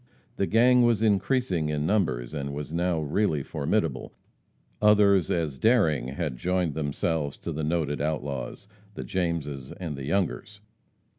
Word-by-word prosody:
The 95 - +1
gang 125 +3 +5
was 115 -3 +3
increasing 100 - +1
in 75 0 -1
numbers, 80 - 0
and 70 -1 -4
was 75 +1 -6
now 85 0 0
really 75 -1 0
formidable. 75 -2 -2 0.7
Others 100 -4 +5
as 80 -6 -1
daring 100 - +3
had 70 -1 -3
joined 90 +1 0
themselves 75 0 -2
to - - -5
the 80 - -3
noted 75 -3 -1
outlaws 75 +2 -3 0.3
the - - -5
Jameses 80 -7 -3
and 85 -5 -5
the 70 -1 -6
Youngers. 100 +5 -2
80 Hz, 140 wpm, -27 LUFS, 75-100 Hz, 0.7 s, gang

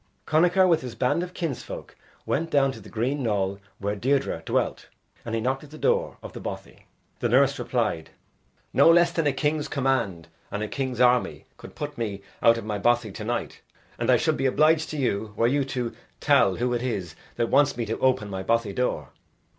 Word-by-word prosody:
Connachar 180 +4 +4
with 165 -3 +3
his 125 -3 -7
band 125 +8 +1
of 180 0 -6
kinsfolk 165 -7 -5 0.3
went 165 +3 -1
down 140 -4 +3
to - - -10
the - - -13
green 130 +6 -1
knoll 100 -4 -1 0.2
where 100 +1 -2
Deirdre 130 -5 0
dwelt - - -1 0.3
and 115 -1 -3
he 115 - -1
knocked 130 +4 -1
at 150 - -12
the 155 - -11
door - - 0
of - - -9
the - - -7
bothy. - - -8 0.3
The - - 0
nurse - - +3
replied, 80 -1 -1 0.6
"No - - +6
less 170 0 +5
than 165 -3 0
a - - +3
king's 150 +2 -1
command 130 - -1 0.2
and 105 - -3
a - - -2
king's 130 0 -3
army 125 0 +2
could - - -13
put 150 -3 -6
me 100 -4 -3 0.2
out 115 0 +5
of 115 - -6
my 105 -1 -3
bothy 120 0 +2
to 105 - -7
night. 120 +2 -3 0.4
And - - -1
I - - +6
should - - +1
be 135 - +1
obliged 155 +4 +3
to 155 - -5
you, 105 -5 -1
were 115 - +3
you 140 +4 +2
to 125 -3 -3 0.3
tell 95 - +4
who 125 +1 -1
it 120 - -1
is 100 -9 -3 0.2
that 115 - 0
wants 140 -2 +4
me 120 - -1
to 115 - -3
open 130 -5 +2
my 95 -1 -4
bothy 115 0 0
door." 125 +4 -1
125 Hz, 210 wpm, -25 LUFS, 110-145 Hz, 0.6 s, No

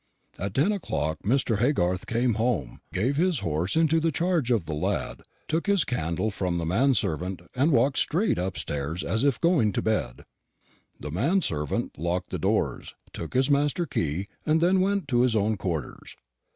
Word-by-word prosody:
"At 100 +1 -4
ten 150 +10 +3
o'clock 80 - -2
Mr. 115 -1 +1
Haygarth 95 -8 +1
came 120 +1 +1
home, 100 - -1
gave 125 +9 0
his 175 -3 +2
horse 85 - -1
into 160 0 +3
the 165 0 +1
charge 165 -4 0
of 115 -9 +1
the 80 - -4
lad, 75 - -2 0.3
took 165 +5 -1
his 200 -6 +3
candle 95 -2 -1
from 90 -3 -2
the 85 - -2
man 125 +11 +3
servant, 90 -1 -2
and 135 +5 +2
walked 130 +1 +3
straight 180 - +1
upstairs, 80 -3 -3
as 110 +8 0
if 140 -3 +2
going 160 - +3
to - - 0
bed. 75 - -1 0.8
The 75 - -6
man 145 - +1
servant 75 -2 -2
locked 90 +2 -2
the - - -3
doors, - - -1 0.2
took 85 - -7
his 130 +2 +3
master 145 +4 +2
the 165 - -8
key, 85 +3 -2 0.2
and 155 +1 +2
then 185 +3 +3
went 195 -3 0
to 120 -2 +3
his 125 -2 +2
own 110 +1 +2
quarters. 85 -8 -5
115 Hz, 180 wpm, -26 LUFS, -, 0.8 s, ten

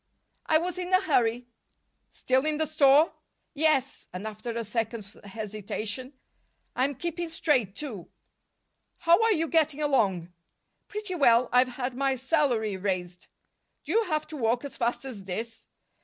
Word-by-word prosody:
"I 315 - +5
was 360 +2 -3
in 360 0 -4
a 370 - +6
hurry." 245 - +1 0.6
"Still 260 +1 0
in 305 -1 0
the 315 - +1
store?" 300 0 +4 0.4
"Yes." 295 -4 +1
And, 185 +3 -6
after 215 +2 -6
a 230 0 -2
second's 220 -1 -4
hesitation: 215 +4 -5 0.6
"I'm 270 +3 +1
keeping 345 +3 -3
straight, 275 - 0
too." 230 - -7 0.9
"How 345 +4 +4
are 450 0 +4
you 325 -2 0
getting 310 -2 +2
along?" 200 - +1 0.5
"Pretty 415 -2 -5
well. 245 -7 +4
I've 250 +1 +5
had 255 -1 -2
my 270 +1 0
salary 255 -7 +1
raised." 180 -2 -3 0.6
"Do - - -5
you 455 0 +3
have 310 -4 -1
to 310 - -6
walk 240 +1 0
as 280 - -7
fast 240 +2 -1
as 220 -8 -8
this?" 225 +5 -6
260 Hz, 150 wpm, -27 LUFS, 220-310 Hz, 0.9 s, a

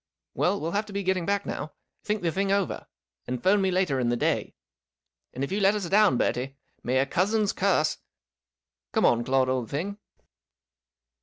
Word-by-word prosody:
Well, 195 +3 +1
we - - -8
'11 165 +4 -2
have 215 - -1
to 205 - -10
be 200 0 -2
getting 185 -2 0
back 200 0 0
now. 150 0 -5 0.3
Think 210 -2 -2
the 165 - +1
thing 195 +3 0
over, 200 -2 -1 0.4
and 125 -1 -4
'phone 200 +2 +4
me 190 - +2
later 180 -7 +1
in 120 -2 +1
the 120 - +1
day. - - -1 0.8
And, 130 - -4
if 140 - -3
you 200 - 0
let 200 +1 +4
us 200 -4 -3
down, 205 - +4
Bertie, 130 +3 -1 0.3
may 125 +2 0
a 135 - +3
cousin's 205 +7 +1
curse 180 -6 +1 0.9
Come - - +3
on, 120 0 +3
Claude, 130 +1 +2
old 130 -3 -1
thing." 195 +8 -4
185 Hz, 190 wpm, -26 LUFS, 135-200 Hz, 0.9 s, phone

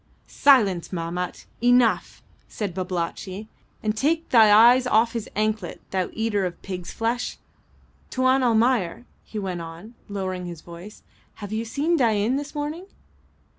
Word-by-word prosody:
'" - - -36 0.2
"Silence, 205 -11 +5
Mahmat; 175 0 -4 0.2
enough!" 245 -2 +3 0.2
said 205 -5 -4
Babalatchi, 185 +2 -4 0.4
"and 215 0 0
take 320 +7 0
thy 220 -4 +6
eyes 240 +4 +7
off 230 0 +3
his 230 -3 -4
anklet, 215 -3 -1
thou 185 -2 -1
eater 220 -3 0
of 175 - -9
pigs 180 -2 -6
flesh. 235 +2 -2 0.7
Tuan 260 +1 +2
Almayer," 230 -3 +1 0.2
he 220 - -9
went 185 -4 -3
on, 165 +7 -10 0.2
lowering 185 -3 -4
his 170 -2 -8
voice, 175 +5 -12 0.3
"have 205 0 -7
you 220 +1 -1
seen 300 +9 0
Dain 225 -2 +2
this 290 +2 -5
morning?" 300 +5 -4
215 Hz, 140 wpm, -24 LUFS, 185-245 Hz, 0.7 s, eyes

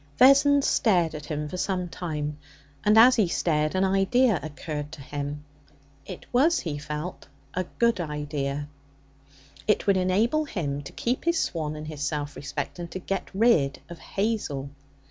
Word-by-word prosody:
Vessons 280 +2 +6
stared 175 -8 +2
at 150 -1 -7
him 150 -1 -3
for 180 - -6
some 180 -1 -1
time, 150 -4 -4 0.4
and, 210 +1 +4
as 250 +3 +8
he 210 -5 +4
stared, 155 -1 0
an 185 - +2
idea 195 +3 +3
occurred 150 0 -5
to 160 - -9
him. 145 +1 -5 0.6
It - - -8
was, 310 +7 +4
he 150 -4 -4
felt, 150 +4 -6 0.3
a 185 0 -1
good 235 -3 +3
idea. 145 -2 -3 1.0
It 210 - +2
would 200 -2 +4
enable 215 +12 +2
him 145 - -3
to 140 - -9
keep 245 +5 -2
his 340 -1 +2
swan 155 - -2
and 150 0 -7
his 155 -2 -7
self 145 0 -2
respect 145 - -5
and 170 -1 -5
to - - -5
get 195 +1 -3
rid 190 - +3
of 170 - -9
Hazel. 195 -10 -2
170 Hz, 165 wpm, -26 LUFS, 150-210 Hz, 1.0 s, as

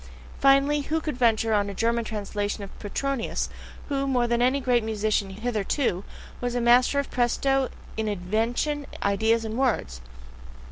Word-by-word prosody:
Finally, 275 +2 +4
who 320 +1 +1
would 310 -4 -4
venture 225 -2 +2
on 205 -1 +2
a 200 - -6
German 235 +3 +1
translation 205 -1 -3
of 195 - -8
Petronius, 260 +4 -2 0.4
who, 275 -1 -1
more 250 -3 +2
than 235 0 +1
any 260 +3 +3
great 245 -3 +2
musician 215 -2 0
hitherto, 215 0 -1 0.4
was 245 0 -2
a - - +1
master 245 +3 +4
of 280 - -1
PRESTO 265 +2 +1 0.3
in 220 0 -2
invention, 225 +9 -1 0.2
ideas, 220 +3 +2
and 220 +3 -3
words? 75 - 0
235 Hz, 150 wpm, -26 LUFS, 215-270 Hz, 0.4 s, Finally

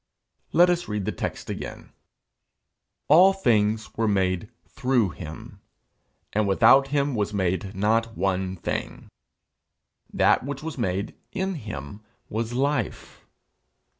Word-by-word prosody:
Let 175 +1 +5
us 175 0 -1
read 105 -2 -3
the - - -1
text - - -5
again: - - -7 1.2
'All 180 +6 +7
things 110 - +1
were 110 0 +1
made 95 0 0 0.2
through 125 -6 +1
him, 80 0 -9 0.7
and 105 0 +1
without 125 +7 +5
him 140 0 0
was 105 -2 -1
made 95 +1 -1
not 110 +3 +1
one 95 0 -1
thing. 85 - -5 1.0
That - - +3
which 140 +1 -5
was 160 -1 -5
made 100 -4 -2 0.2
in 190 0 -1
him 100 - -7 0.3
was 115 +2 -2
life.' 135 -2 -2
110 Hz, 120 wpm, -25 LUFS, 95-140 Hz, 1.2 s, All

